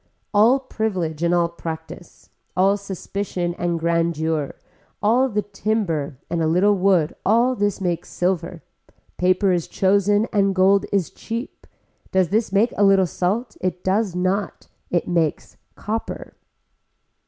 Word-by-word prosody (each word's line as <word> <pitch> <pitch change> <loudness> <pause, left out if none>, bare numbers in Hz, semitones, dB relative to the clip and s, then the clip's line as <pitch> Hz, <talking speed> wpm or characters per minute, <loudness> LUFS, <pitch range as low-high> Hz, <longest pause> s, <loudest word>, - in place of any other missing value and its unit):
All 220 +6 +5
privilege 190 - -3
and 170 0 +2
all 175 -1 +3
practice, 165 0 -9 0.3
all 195 +2 +4
suspicion 195 -2 -4
and 175 -1 -1
grandeur, 160 -3 0 0.4
all 245 +5 +3
the 210 -2 -1
timber 195 - -2
and 170 0 -2
a 160 - +2
little 185 +6 +4
wood 185 -5 +2
all 235 +5 +3
this 205 -4 -1
makes 175 -3 -2
silver, 175 -1 -2 0.5
paper 185 +2 +2
is 175 -2 0
chosen 200 +2 +2
and 195 -2 +2
gold 195 +1 +4
is 195 -5 0
cheap, 230 +4 -7 0.4
does 185 -3 +2
this 220 +2 0
make 210 +4 +2
a 205 - +3
little 195 -1 +5
salt, 195 +8 -2
it 180 -1 -2
does 190 -1 0
not, 185 +3 -2 0.2
it 175 - 0
makes 165 -3 -1 0.2
copper. 220 +2 -5
190 Hz, 135 wpm, -22 LUFS, 170-205 Hz, 0.5 s, All